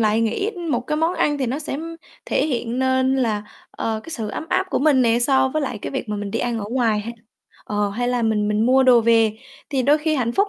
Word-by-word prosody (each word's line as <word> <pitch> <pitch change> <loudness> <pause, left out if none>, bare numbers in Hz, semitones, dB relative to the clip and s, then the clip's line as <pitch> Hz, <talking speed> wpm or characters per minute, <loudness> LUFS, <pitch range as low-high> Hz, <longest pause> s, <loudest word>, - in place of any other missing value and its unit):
lại 215 0 +2
nghĩ 230 - 0 0.2
một 245 -4 +1
cái 280 +5 -3
món 325 +3 +1
ăn 295 -1 +1
thì 265 - -1
nó 255 +4 -2
sẽ 285 -2 -4 0.5
thể - - 0
hiện 245 -4 -2
nên 260 0 +2
là, 220 -5 0 0.3
ờ, 220 -1 -3
cái - - -10
sự 225 -9 -4
ấm 260 - -5
áp 380 - +1
của - - +1
mình 280 -3 +4
nè, 230 -1 +3
so 265 +2 +3
với 310 +3 -2
lại 255 -5 -3
cái - - -5
việc 265 -4 -4
mà 210 - -2
mình 205 -1 -5
đi 230 - -2
ăn 240 -1 -1
ở 205 - -4
ngoài 230 -4 +1
ha, 230 +3 -6 0.5
ờ, 205 -1 -1
hay 245 +4 -2
là 245 -1 0
mình 215 -2 +1
mình 210 +2 +1
mua 260 +1 +5
đồ 250 -2 +6
về. 225 -1 +3 0.3
Thì 270 -2 0
đôi 290 +4 +4
khi 310 +1 0
hạnh 240 -5 0
phúc 400 +10 +2
245 Hz, 265 wpm, -21 LUFS, 225-270 Hz, 0.5 s, đồ